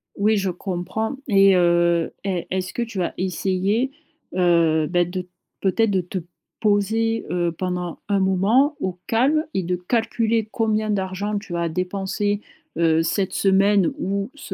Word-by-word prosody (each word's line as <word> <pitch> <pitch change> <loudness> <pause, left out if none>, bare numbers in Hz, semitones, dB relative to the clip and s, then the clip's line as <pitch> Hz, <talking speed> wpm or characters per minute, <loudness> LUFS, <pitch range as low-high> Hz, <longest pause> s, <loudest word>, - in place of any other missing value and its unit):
Oui, 215 +2 +2
je 195 -1 0
comprends 190 +7 -3
et 195 -3 +5
heu, 170 -1 +3
est 185 -3 -2
est-ce 185 -1 -2
que 240 - -1
tu 220 -5 -4
as 175 - -2
essayé, 190 +6 0 0.5
heu, 170 -3 +3
bah, 175 +2 +2
de, 180 +1 -5 0.4
peut-être, 215 +3 +2
de 190 -2 +1
te 180 +2 -5 0.4
poser, 220 +2 +1
heu, 175 -1 0
pendant 180 0 -3
un 200 -1 +2
moment, 200 +10 +3
au 185 -7 -3
calme 275 +7 +2
et 190 - +1
de 180 +1 -1
calculer 225 +3 0
combien 215 -1 0
d'argent 200 +1 -2
tu 200 -4 -7
as 170 0 0
dépensé, 195 +4 -2 0.4
heu, 165 -1 +3
cette 185 +4 -1
semaine 195 -1 +3
ou 200 +2 -2
ce 285 - -8
190 Hz, 155 wpm, -22 LUFS, 180-215 Hz, 0.5 s, et